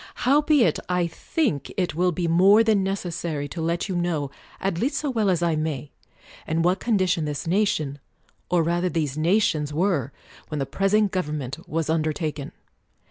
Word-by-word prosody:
Howbeit 290 0 +4
I 180 -1 +1
think 170 - -2
it 180 -5 0
will 180 +3 +2
be 175 +1 -2
more 190 +6 +6
than 220 -3 +3
necessary 175 -6 -3
to 165 - -5
let 170 +3 -1
you 190 - -3
know, 165 -5 -1 0.3
at 190 -3 -1
least 265 - 0
so 290 -3 -1
well 220 -5 +1
as 175 -2 +1
I 170 -2 +2
may, 150 -3 -3 0.6
in 165 +1 0
what 180 +3 +2
condition 185 -8 +1
this 150 +1 -4
nation, 165 -6 0 0.5
or 175 -2 +3
rather 175 +2 0
these 155 -5 -1
nations, 155 -3 +1
were, 155 - 0 0.4
when 150 - -4
the 135 - -1
present 195 +7 +1
government 150 -7 -4
was 160 0 -1
under 155 -1 +1
taken. 150 -2 -4
170 Hz, 170 wpm, -24 LUFS, 155-195 Hz, 0.6 s, more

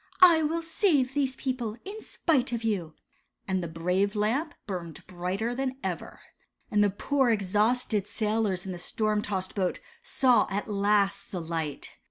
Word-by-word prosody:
I 335 -3 +8
will 325 +2 0
save 320 -6 +2
these 270 -2 +1
people, 245 -5 -3
in 420 +3 -7
spite 270 -12 +1
of 235 -1 -2
you," 185 -8 -1 0.5
and 190 -1 0
the 170 - -3
brave 180 +5 0
Lamp 245 +10 0
burned 175 -5 -6
brighter 185 +6 -2
than 260 +1 -2
ever. - - -4 0.5
And 210 0 +4
the 205 - +4
poor, 265 +6 +1
exhausted 210 +1 +1
sailors 210 -4 0
in 190 - -4
the 175 - -6
storm 215 +3 0
tossed 190 -3 -3
boat 185 -3 -1 0.2
saw 255 -3 +3
at 205 +1 -2
last 200 -1 +1
the 185 - -3
light. 165 -3 -3
210 Hz, 160 wpm, -28 LUFS, 190-255 Hz, 0.5 s, I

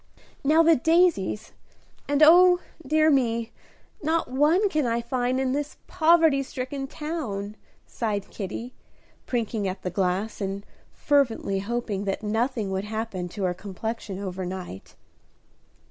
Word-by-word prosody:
"Now 310 +4 +5
the 330 0 +6
daisies; 320 - +2 0.6
and 285 +1 +3
oh, 355 +2 +7 0.2
dear 310 +2 +3
me, 235 -4 +1 0.5
not 320 -3 0
one 310 +10 +3
can 305 -8 0
I 230 0 0
find 245 +2 -1
in 265 -1 0
this 290 +2 -3
poverty 320 -4 +4
stricken 270 +1 -5
town," 265 -11 -5 0.3
sighed 210 -4 -3
Kitty, 230 +5 -6 0.5
prinking 225 -4 -1
at 185 +1 -5
the 180 - -2
glass, 190 +4 -1
and 195 +1 -3 0.3
fervently 240 -9 +1
hoping 205 -1 -3
that 195 +2 -2
nothing 220 -1 -1
would 190 +1 -2
happen 215 -4 -4
to 200 +2 -5
her 180 -1 +1
complexion 200 +2 -5
over 190 -1 -5
night. 180 - -7
235 Hz, 130 wpm, -25 LUFS, 200-290 Hz, 0.6 s, oh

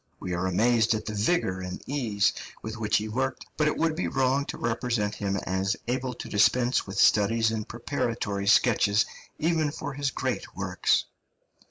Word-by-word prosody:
We 90 - -4
are 90 +2 -1
amazed 115 +4 +3
at 110 - -4
the 110 - -4
vigour 105 - +1
and 90 -1 -5
ease 115 -8 +1 0.3
with 110 +1 -5
which 110 -2 +1
he 105 - -2
worked, 130 +4 -2
but 150 - +2
it 150 - 0
would 165 -1 +1
be 175 - -1
wrong 135 +2 +1
to - - -6
represent 115 -3 -1
him 100 -2 -2
as 95 +1 0
able 125 0 -2
to - - -7
dispense 120 +5 +2
with 95 - -6
studies 110 +2 +4
and 110 -1 -3
preparatory 115 -5 -2
sketches, 105 -2 +4 0.3
even 160 -1 +1
for 145 0 -5
his 140 0 -1
great - - -3
works. - - +1
115 Hz, 175 wpm, -27 LUFS, 105-130 Hz, 0.3 s, studies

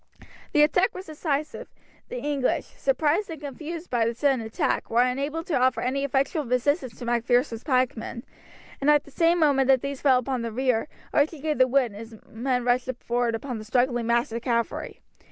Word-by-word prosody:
The 300 - +6
attack 360 +5 +2
was 370 - -7
decisive; 305 -1 -3 0.4
the - - -5
English, 290 - 0
surprised 390 -3 0
and 320 -3 -6
confused 315 +4 -7
by 240 -2 +2
the 230 - -2
sudden 270 -1 +2
attack, 220 0 -1
were 235 +2 +4
unable 280 +6 -2
to 330 - -5
offer 255 0 +2
any 270 +3 -1
effectual 280 +3 0
resistance 250 0 0
to 245 - -7
Macpherson's 240 0 +1
pikemen, 255 -3 -1 0.6
and 280 - +2
at 295 -1 +5
the 285 - -16
same 335 +4 +3
moment 280 -4 +3
that 265 -2 +5
these 280 -1 -4
fell 265 -3 +5
upon 255 0 -2
the 230 -1 -3
rear, 255 +2 0 0.3
Archie 295 +2 +2
gave 305 0 -2
the 255 - +6
word 255 -2 +2
and 200 - -11
his 225 +1 -10
men 250 +2 -1
rushed 245 +1 +1
forward 240 -1 0
upon 245 0 -5
the - - -7
struggling 240 0 +1
mass 235 +2 +1
of 230 +1 -4
cavalry. 235 -1 -2
260 Hz, 190 wpm, -25 LUFS, 240-295 Hz, 0.6 s, The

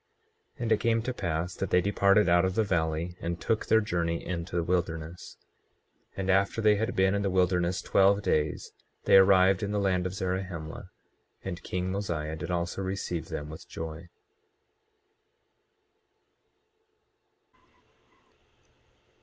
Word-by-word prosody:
24:24 - - -13
And 115 - -2
it 110 - +4
came 115 -1 +1
to 130 - -3
pass 85 -4 -3
that 95 - -3
they 90 - +4
departed 100 +2 +3
out 85 +1 +4
of 95 0 0
the 110 - +3
valley, 85 -2 -1
and 85 0 -3
took 110 +3 -1
their 110 - +4
journey 85 -5 -2
into 85 -1 -4
the 85 - +1
wilderness. 85 -1 -3 0.8
24:25 - - -25
And 95 -1 -2
after 100 +3 +2
they 105 -1 +4
had 110 +4 -2
been 95 0 +3
in 100 - 0
the 100 - 0
wilderness 90 0 +1
twelve 100 +1 +3
days 75 -4 -1 0.3
they - - +6
arrived 95 0 +5
in 100 -1 -2
the 105 - 0
land 90 -2 +1
of 90 - -7
Zarahemla; 90 -2 -4 0.5
and 95 -1 -5
king 90 +1 -3
Mosiah 85 -6 -3
did 80 - -6
also 85 +2 -2
receive 95 -3 -4
them 75 +1 -5
with 80 - -11
joy. 80 +1 -7
90 Hz, 145 wpm, -28 LUFS, 85-100 Hz, 0.8 s, they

